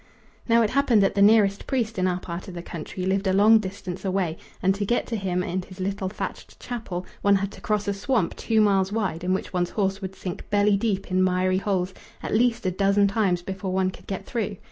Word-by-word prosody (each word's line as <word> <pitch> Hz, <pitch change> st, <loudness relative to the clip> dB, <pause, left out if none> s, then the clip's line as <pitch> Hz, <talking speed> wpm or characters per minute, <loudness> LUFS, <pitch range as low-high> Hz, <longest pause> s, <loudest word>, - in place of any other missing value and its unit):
Now 230 Hz, 0 st, +5 dB
it 210 Hz, -, 0 dB
happened 250 Hz, -6 st, +4 dB
that 195 Hz, -, +2 dB
the 200 Hz, -, +1 dB
nearest 205 Hz, -1 st, +4 dB
priest 225 Hz, -6 st, -1 dB
in 185 Hz, -, +2 dB
our 180 Hz, 0 st, 0 dB
part 170 Hz, 0 st, -7 dB
of 185 Hz, -, -8 dB
the 170 Hz, -, -6 dB
country 175 Hz, +2 st, -6 dB
lived 195 Hz, +1 st, 0 dB
a 190 Hz, -, +2 dB
long 215 Hz, +3 st, +6 dB
distance 190 Hz, -2 st, -6 dB
away, 185 Hz, -4 st, 0 dB, 0.2 s
and 190 Hz, +1 st, +2 dB
to 200 Hz, +1 st, -3 dB
get 240 Hz, +4 st, 0 dB
to 235 Hz, -, -3 dB
him 185 Hz, -3 st, -1 dB
and 185 Hz, +1 st, -2 dB
his 185 Hz, +1 st, -13 dB
little 195 Hz, 0 st, -2 dB
thatched 200 Hz, -, -7 dB
chapel 210 Hz, -7 st, -5 dB, 0.2 s
one 200 Hz, 0 st, +4 dB
had 195 Hz, 0 st, -1 dB
to -, -, -13 dB
cross 210 Hz, -1 st, -1 dB
a 200 Hz, -, +1 dB
swamp 200 Hz, -1 st, 0 dB
two 220 Hz, -2 st, +1 dB
miles 195 Hz, -2 st, +3 dB
wide 195 Hz, -6 st, -2 dB
in 180 Hz, -, 0 dB
which 190 Hz, 0 st, -2 dB
one's 175 Hz, -1 st, 0 dB
horse 195 Hz, -1 st, -1 dB
would 190 Hz, 0 st, -6 dB
sink 180 Hz, -2 st, -7 dB
belly 205 Hz, 0 st, +3 dB
deep 200 Hz, -2 st, -1 dB
in 185 Hz, 0 st, +3 dB
miry 185 Hz, 0 st, +2 dB
holes 185 Hz, -2 st, -1 dB, 0.3 s
at -, -, -3 dB
least 235 Hz, 0 st, +2 dB
a 185 Hz, -, +2 dB
dozen 200 Hz, +2 st, +3 dB
times 195 Hz, -4 st, +1 dB
before 190 Hz, 0 st, -4 dB
one 185 Hz, 0 st, +1 dB
could -, -, -15 dB
get 195 Hz, -, -4 dB
through. 215 Hz, -4 st, -3 dB
195 Hz, 235 wpm, -25 LUFS, 185-210 Hz, 0.3 s, long